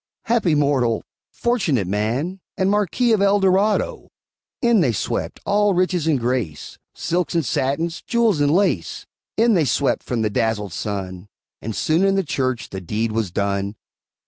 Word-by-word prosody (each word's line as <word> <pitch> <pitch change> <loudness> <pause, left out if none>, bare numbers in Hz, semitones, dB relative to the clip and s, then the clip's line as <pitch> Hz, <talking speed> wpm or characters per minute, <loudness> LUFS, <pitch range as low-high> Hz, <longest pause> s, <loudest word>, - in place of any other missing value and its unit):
Happy 220 -9 +2
mortal! 140 -6 +1 0.3
fortunate 180 - 0
man! 115 - -2 0.2
And 190 +1 +2
Marquis 210 +4 +1
of 215 -3 +3
El 200 +1 +4
Dorado! 200 - +1 0.5
In 235 -5 +3
they 130 -8 +2
swept, - - -3
all 205 -1 +2
riches 180 -3 +1
and 150 -5 +2
grace, 120 - -3 0.2
Silks 175 0 -1
and 165 -3 +1
satins, 140 +8 -1
jewels 230 -9 +1
and 145 - +3
lace; 195 +5 0 0.3
In 230 0 +4
they 170 -6 +3
swept 135 +2 +1
from 120 -3 -2
the 105 - 0
dazzled 105 -3 -1
sun, 95 -1 -5 0.3
And 110 -1 -5
soon 160 +4 +1
in 195 0 +3
the 195 - +1
church 130 -6 -2
the 95 - -6
deed 110 +5 -2
was 110 -3 -1
done. 100 +2 -2
150 Hz, 160 wpm, -21 LUFS, -, 0.5 s, El